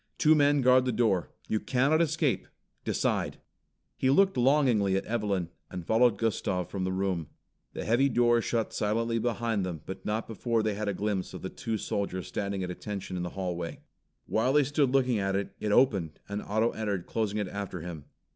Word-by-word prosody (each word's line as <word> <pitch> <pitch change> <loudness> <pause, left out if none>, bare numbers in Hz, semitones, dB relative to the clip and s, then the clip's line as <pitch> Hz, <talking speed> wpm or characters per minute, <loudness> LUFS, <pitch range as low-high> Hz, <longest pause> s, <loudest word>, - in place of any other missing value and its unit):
"Two 155 0 +5
men 145 -1 +4
guard 130 0 +5
the 125 - +1
door. 110 -6 +1 0.2
You 110 - 0
cannot 140 +8 +2
escape. 160 -4 +1 0.4
Decide!" - - 0 0.6
He 130 - +2
looked 190 +8 +4
longingly 125 -7 +3
at 95 - -1
Evelyn 100 -6 -1 0.2
and 90 -2 -6
followed 115 0 +4
Gustav 95 -5 -1
from 95 -2 -2
the 95 - -1
room. 95 -4 -1 0.5
The - - -5
heavy 125 +5 +3
door 120 -1 +3
shut 115 -1 -1
silently 115 +2 0
behind 115 -3 0
them 85 -4 -4
but 95 - -7
not 110 +2 -1
before 115 0 -1
they 110 -1 0
had 105 +1 -3
a 100 - 0
glimpse 100 -1 -2
of - - -8
the - - -3
two 115 -1 -3
soldiers 95 -3 -3
standing 100 -2 -3
at 90 - -3
attention 95 0 -5
in 90 - -2
the 90 - -3
hallway. 90 -3 -3 0.4
While 125 +4 +1
they 150 0 +5
stood 145 0 +1
looking 130 -4 +2
at 95 0 0
it, 100 0 -2
it 105 - -1
opened 100 - +2
and 100 +1 -3
Otto 110 +3 +1
entered, 100 -5 -3
closing 110 -2 -1
it 105 -2 -1
after 95 -2 -5
him. 80 -4 -7
110 Hz, 195 wpm, -29 LUFS, 95-125 Hz, 0.6 s, Two